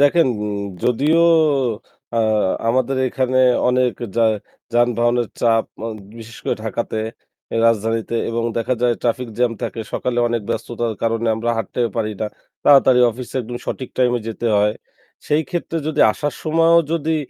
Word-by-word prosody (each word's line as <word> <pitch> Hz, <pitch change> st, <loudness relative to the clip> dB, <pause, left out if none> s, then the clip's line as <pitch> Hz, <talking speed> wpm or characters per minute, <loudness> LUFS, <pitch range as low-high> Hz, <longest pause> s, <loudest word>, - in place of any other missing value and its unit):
দেখেন 145 Hz, +2 st, +5 dB, 0.6 s
যদিও 145 Hz, +7 st, +2 dB, 1.0 s
আ -, -, +3 dB, 0.5 s
আমাদের 130 Hz, +2 st, +1 dB
এখানে 130 Hz, 0 st, 0 dB, 0.3 s
অনেক 125 Hz, -1 st, +2 dB, 0.2 s
যা 115 Hz, -, +4 dB, 0.5 s
যানবাহনের 120 Hz, 0 st, +2 dB
চাপ 115 Hz, -1 st, +3 dB, 0.2 s
আ -, -, -2 dB, 0.3 s
বিশেষ 115 Hz, 0 st, -11 dB
করে -, -, 0 dB
ঢাকাতে 110 Hz, 0 st, -3 dB, 0.7 s
রাজধানীতে 115 Hz, +1 st, 0 dB
এবং 115 Hz, 0 st, -1 dB, 0.2 s
দেখা 120 Hz, +2 st, 0 dB
যায় 120 Hz, -1 st, +3 dB
ট্রাফিক 120 Hz, +1 st, -1 dB
জ্যাম 125 Hz, -2 st, +2 dB
থাকে 115 Hz, -, -3 dB
সকালে 125 Hz, -1 st, -1 dB
অনেক 115 Hz, -2 st, -1 dB
ব্যস্ততার 120 Hz, -1 st, -3 dB
কারণে 115 Hz, 0 st, 0 dB
আমরা 115 Hz, +2 st, -1 dB
হাঁটতে 115 Hz, +2 st, -3 dB, 0.2 s
পারি 110 Hz, -1 st, -1 dB
না, 110 Hz, -, 0 dB, 0.4 s
তাড়াতাড়ি 135 Hz, -3 st, +6 dB
অফিসে 125 Hz, +3 st, -9 dB
একদম 120 Hz, +1 st, -6 dB
সঠিক 130 Hz, -, -4 dB
টাইমে 125 Hz, -1 st, +2 dB
যেতে 115 Hz, +1 st, -4 dB
হয়। 105 Hz, +1 st, +2 dB, 0.5 s
সেই 150 Hz, +2 st, +2 dB
ক্ষেত্রে 170 Hz, -1 st, -3 dB
যদি 155 Hz, -1 st, 0 dB
আসার 145 Hz, -, -3 dB
সময়ও 165 Hz, +1 st, +4 dB
যদি 160 Hz, -1 st, 0 dB
120 Hz, 140 wpm, -20 LUFS, 115-130 Hz, 1.0 s, তাড়াতাড়ি